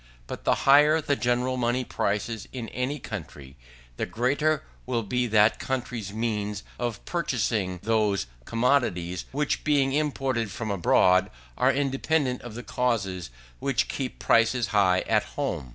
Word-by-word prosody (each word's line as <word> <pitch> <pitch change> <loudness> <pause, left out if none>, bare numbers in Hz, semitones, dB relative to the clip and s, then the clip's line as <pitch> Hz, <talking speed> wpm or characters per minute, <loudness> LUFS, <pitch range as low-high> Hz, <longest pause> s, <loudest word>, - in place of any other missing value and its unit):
But - - -8
the - - +4
higher 150 +3 +6
the 145 -2 0
general 125 0 0
money 125 +1 0
prices 105 +1 -2
in 120 -4 -6
any 130 +4 -2
country, 75 - -8 0.4
the - - -2
greater 140 +6 +1 0.2
will 120 -3 0
be 125 +4 0
that 110 0 +4
country's 120 -6 -3
means 105 -2 -2 0.2
of 120 -3 -3
purchasing 110 - -1
those 105 - +1 0.2
commodities 115 -8 0
which, 145 +1 -1
being 140 -3 +2
imported 135 -6 0
from 110 +2 -4
abroad, 90 -1 +4 0.3
are 130 - +3
independent 135 0 0
of 120 -3 -9
the 120 - -6
causes 100 - -1 0.3
which - - 0
keep 130 -2 -4
prices 115 0 +2
high 95 -4 +3
at - - +2 0.2
home. 65 - -2
120 Hz, 140 wpm, -26 LUFS, 105-130 Hz, 0.4 s, higher